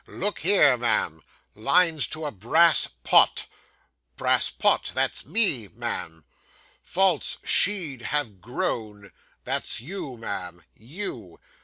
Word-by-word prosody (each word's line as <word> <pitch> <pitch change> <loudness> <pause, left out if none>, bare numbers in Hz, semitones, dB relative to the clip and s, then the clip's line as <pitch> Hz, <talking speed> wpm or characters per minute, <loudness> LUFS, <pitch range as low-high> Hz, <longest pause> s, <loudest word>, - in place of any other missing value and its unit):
'Look 205 +3 -4
here, 155 -8 +4
ma'am 105 -9 -1 0.3
"Lines 150 - +3
to 155 0 -6
a 145 - -3
Brass 140 - +3 0.2
Pot." - - +4 0.7
"Brass - - +2
Pot"; - - +1
that's - - -1
me, 145 - +2
ma'am. 80 -2 -6 0.6
"False 185 -4 0
she'd 170 -11 +1
have 120 -8 -3
grown"; 105 -4 -4 0.3
that's - - -1
you, 135 - -7
ma'am 90 -6 -7
you. 120 - -6
125 Hz, 110 wpm, -25 LUFS, 105-170 Hz, 0.7 s, here